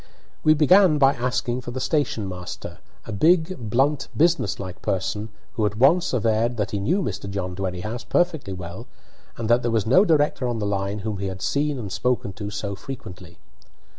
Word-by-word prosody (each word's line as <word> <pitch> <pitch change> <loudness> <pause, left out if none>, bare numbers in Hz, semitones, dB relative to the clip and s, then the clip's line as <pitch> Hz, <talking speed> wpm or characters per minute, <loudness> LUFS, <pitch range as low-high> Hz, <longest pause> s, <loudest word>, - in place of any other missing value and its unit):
We 155 0 +6
began 170 +2 +5
by 135 -1 +5
asking 125 0 -1
for 120 - -7
the 125 +2 -4
station 130 -8 0
master, 90 -1 -7 0.3
a - - -6
big, 160 - +2
blunt, 135 +6 +1
businesslike 100 - 0
person, 95 +3 -2 0.2
who 110 -4 0
at 105 +1 -5
once 160 +9 +4
averred 115 0 +1
that 105 -2 -1
he 100 - -1
knew 175 - +1
Mr. 100 0 -4
John 95 -2 -3
Dwerrihouse 95 +5 -4
perfectly 160 - +1
well, 90 +5 -8 0.5
and 115 - -3
that 120 +2 +4
there 120 - -1
was 115 -3 +1
no 135 - +6
director 150 -7 +2
on 120 -1 -1
the 105 - -2
line 100 0 -1
whom 105 -3 -3
he 100 - -2
had 95 0 -6
seen 145 0 0
and 105 -6 -6
spoken 125 -4 -1
to 105 +1 -6
so 105 -1 -4
frequently. 95 -6 -9
115 Hz, 185 wpm, -24 LUFS, 100-140 Hz, 0.5 s, We